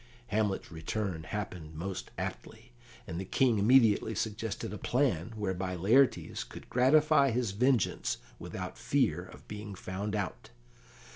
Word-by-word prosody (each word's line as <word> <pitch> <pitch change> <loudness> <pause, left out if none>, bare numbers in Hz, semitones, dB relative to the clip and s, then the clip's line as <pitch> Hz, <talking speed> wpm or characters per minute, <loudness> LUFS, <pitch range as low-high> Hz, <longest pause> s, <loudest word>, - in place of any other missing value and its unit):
Hamlet's 105 -4 0
return 85 +2 -3
happened 90 -5 -5
most 90 +4 -4
aptly, 115 +3 -6 0.3
and 85 -2 -5
the - - -3
King 115 +3 +2
immediately 110 -1 +5
suggested 110 +1 -3
a - - -4
plan 115 - +1
whereby 95 -3 -2
Laertes 115 +10 +3
could - - -11
gratify 140 +3 +5
his 120 -3 0
vengeance 120 +1 +1 0.2
without - - -6
fear - - +1
of - - -14
being 105 -1 -7
found 100 +3 -4
out. 100 -3 -4
105 Hz, 130 wpm, -31 LUFS, 95-120 Hz, 0.3 s, immediately